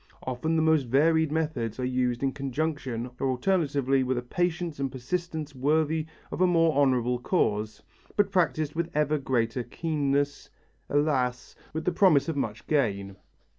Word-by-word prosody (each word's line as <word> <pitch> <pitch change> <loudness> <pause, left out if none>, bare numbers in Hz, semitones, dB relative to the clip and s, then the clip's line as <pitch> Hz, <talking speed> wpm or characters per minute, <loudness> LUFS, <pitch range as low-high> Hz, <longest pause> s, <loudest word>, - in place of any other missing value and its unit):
Often 130 +6 -1
the 160 - +3
most 160 -3 +3
varied 160 +4 +3
methods 150 -8 -2
are 125 - -1
used 125 -1 0
in 135 - +2
conjunction 135 -3 -3
or 135 - 0
alternately 140 -2 +1
with 130 0 -1
a 120 - -2
patience 175 +2 -2
and 135 -1 -1
persistence 155 +3 -4
worthy 155 +3 +1 0.2
of - - -3
a 185 - +6
more 165 -2 +3
honourable 125 -4 +2
cause, 110 - 0 0.3
but 205 -1 +2
practised 155 -5 +1
with 170 +1 -2
ever 150 0 +2
greater 125 -2 0
keenness, 145 +1 -1 0.4
alas, 130 -4 0 0.2
with 160 +1 -4
the 180 - +2
promise 170 -6 +4
of 165 - -2
much 110 -6 -3
gain. 100 -10 0
145 Hz, 155 wpm, -27 LUFS, 125-160 Hz, 0.4 s, a